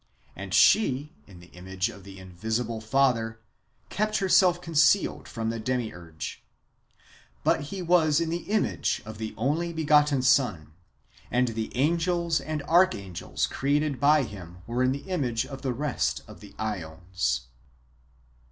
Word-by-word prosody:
And - - -8
she, 150 -7 +4
in 90 -4 -14
the 85 - -17
image 95 +1 -4
^ - - -7
of 100 -2 -14
the 95 0 -11
invisible 110 +5 -3
Father, 115 -2 +1 0.5
kept 215 +2 0
herself 185 -2 +4
concealed 160 -2 +2
from 115 -1 -3
the 115 - -4
Demiurge. 100 -10 -4 1.0
But - - +2
he 190 -2 -5
was 165 -3 +3
in 165 -1 -1
the 175 +3 -4
image 215 0 0
of 110 0 -9
the 110 -1 -5
only 150 +9 0
begotten 150 -4 +3
Son, 100 - +2 0.6
and 125 0 +2
the 110 -1 -4
angels 170 +3 +1
and 155 -1 -4
archangels 150 - +1
created 145 0 0
by 145 +2 +4
him 90 -5 -10
w^ere 120 +2 0
in 130 - +3
the 140 +1 -4
imao 135 -12 -1
e - - -11
of 135 -1 -8
the 130 - -1
rest 140 +2 -1
of - - -12
the - - -13
^ons. 90 - -3
130 Hz, 150 wpm, -27 LUFS, 105-155 Hz, 1.0 s, she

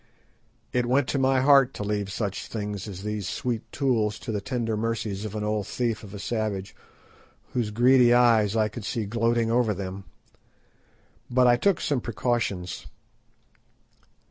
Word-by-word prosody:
It 125 -1 +1
went 130 +1 +2
to 140 - 0
my 130 0 +3
heart 135 -1 +5
to - - -4
leave 105 -1 -2
such 100 -2 -3
things 105 -2 -5
as 95 -2 -8
those 105 -2 -3
sweet 120 -3 -3
tools 110 -7 0
to - - -4
the 105 -2 -2
tender 115 -1 -2
mercies 110 -2 -2
of 105 0 -6
an 105 - -3
old 105 -2 -1
thief 115 -3 -2
of 105 -1 -10
a - - -5
savage 100 -2 -3 0.8
whose 120 -4 0
greedy 120 +2 +5
eyes 115 -4 +4
I 110 -1 +3
could 105 +1 -8
see 110 +1 -2
gloating 115 +1 +1
over 115 -3 +2
them. 95 0 -6 1.2
But 125 +1 +3
I 120 -1 +6
took 195 +8 +2
some 140 -5 0
precautions. 105 -4 -2
110 Hz, 160 wpm, -26 LUFS, 105-120 Hz, 1.2 s, I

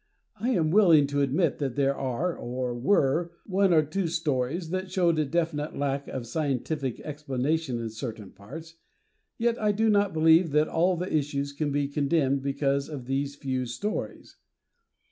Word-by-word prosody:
I 240 - -1
am 165 -11 +2
willing 170 -7 +6
to 145 0 -1
admit 140 +4 +1
that 135 -4 -2
there 140 -1 +2
are 135 +8 -2
or 125 0 -3
were 150 +5 +1
one 195 -1 +2
or 160 -2 +5
two 170 +5 -2
stories 160 0 -1
that 185 0 -2
showed 170 -4 +2
a 155 - +2
definite 155 -1 -2
lack 140 0 -1
of 130 -3 -5
scientific 140 0 -2
explanation 145 -1 -2
in 115 -1 -4
certain 110 -3 -7
parts, 160 +11 -11 0.6
yet 235 0 0
I 210 -1 +3
do 220 +2 +2
not 205 -1 +3
believe 160 +2 +5
that 150 +1 +4
all 175 +2 +1
the 180 0 -2
issues 140 -1 -1
can 145 0 -2
be 145 0 0
condemned 140 -1 +1
because 140 +1 0
of 140 -5 -7
these 140 +2 -2
few 130 -3 -3
stories. 125 - -5
150 Hz, 165 wpm, -27 LUFS, 135-170 Hz, 0.6 s, willing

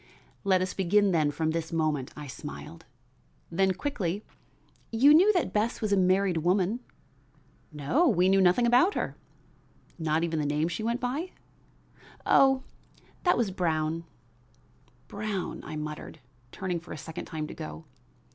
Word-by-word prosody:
"Let 190 -2 +3
us 185 - -3
begin 200 +2 +3
then 155 -4 +2
from 160 +2 -1
this 165 0 -3
moment," 155 -5 -1
I 150 - -7
smiled; 150 +4 -9 0.7
then 190 +2 +2
quickly: 205 - -3 0.7
"You 265 +6 +6
knew 370 +7 +7
that 355 - 0
Bess 215 +3 0
was 215 -2 0
a - - +5
married 185 -1 +2
woman." 185 +7 +1 0.9
"No, 155 - +1
we 185 - +3
knew 195 0 +4
nothing 185 +6 +4
about 250 +12 +4
her." - - -2 0.8
"Not 160 0 +1
even 165 -2 -1
the 150 - -1
name 150 +3 0
she 175 +5 -4
went 235 +2 -1
by?" 280 +9 -3 0.9
"Oh, 270 -1 +5 0.6
that 355 - +4
was 225 -5 0
Brown." 165 -2 -1 1.0
"Brown," 205 -2 -4
I - - -7
muttered, 150 +1 -6 0.3
turning 180 -3 -3
for 170 - -10
a - - -7
second 160 +2 -7
time 155 -3 -4
to - - -8
go. 160 0 -8
185 Hz, 150 wpm, -28 LUFS, 160-215 Hz, 1.0 s, knew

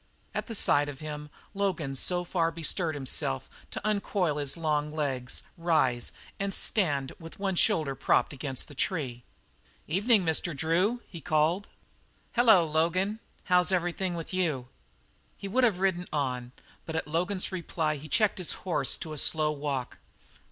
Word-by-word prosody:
At - - -3
sight 145 -4 +3
of 135 -2 -8
him 150 -1 -6 0.2
Logan 190 -8 -1
so 175 +6 +1
far 170 -2 +1
bestirred 165 0 -1
himself 130 - -2 0.2
as - - -25
to 210 - -4
uncoil 200 -6 +1
his 145 +1 -1
long 150 -2 0
legs, 135 -5 -2 0.2
rise, 145 -8 +2 0.3
and 200 0 -1
stand 145 -10 +1
with 165 -1 -10
one 195 -1 0
shoulder 155 -5 +2
propped 135 - +2
against 135 -1 -4
the 145 - -11
tree. 135 -5 -2 0.7
"Evening, 200 +3 +3
Mr. 160 -1 0
Drew," 185 - +1
he 170 -3 -9
called. 155 +7 +2 0.6
"Hello, 220 -8 +6
Logan. 170 +7 +1 0.2
How's 180 -2 +4
everything 175 0 0
with 165 +2 -5
you?" 155 -9 0 0.7
He 200 - -6
would 255 +6 +2
have 220 -7 +4
ridden 185 -2 0
on, 125 -4 -1 0.4
but 160 - -4
at 160 - -1
Logan's 180 +6 0
reply 165 -4 -1
he 155 +2 -10
checked 215 -3 +2
his 180 - 0
horse 160 -8 +2
to 155 - -6
a 150 - -2
slow 155 +1 +3
walk. 140 -4 -3
165 Hz, 155 wpm, -29 LUFS, 145-185 Hz, 0.7 s, Hello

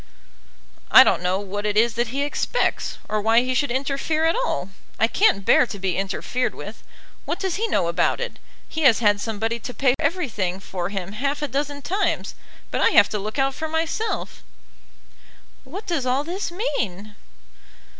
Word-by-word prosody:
"I - - +10
don't - - +2
know 180 +1 0
what 205 +1 -5
it 210 0 0
is 230 +1 +4
that 235 +1 0
he 275 +5 -2
expects, 290 +11 -1
or 215 0 -1
why 225 +2 +4
he 255 +1 -1
should 285 +3 +1
interfere 275 +5 0
at 325 - +3
all. - - -2 0.3
I - - +5
can't 220 - +2
bear 250 - +5
to 205 - -7
be 190 -2 -1
interfered 195 +6 -2
with. - - -9 0.4
What - - -2
does 380 -2 -1
he 455 +2 0
know 175 - +1
about 170 - +1
it? 485 0 -5 0.3
He 320 - -4
has 260 -7 +6
had 205 -3 +2
somebody 225 +1 -2
to 250 +2 -7
pay 265 -3 +3
everything 255 - -1
for 180 -2 -4
him 195 -2 -4
half 280 +7 -2
a - - 0
dozen 285 +2 -3
times, 390 +4 -1 0.4
but - - -1
I - - +5
have - - +6
to 210 - -2
look 215 +5 -5
out 270 0 +2
for 315 - -4
myself." 325 +8 -2 1.2
"What 370 +11 -8
does 330 -9 -1
all 260 +3 +1
this 360 +5 -3
mean?" 215 - -3
250 Hz, 185 wpm, -23 LUFS, 205-310 Hz, 1.2 s, I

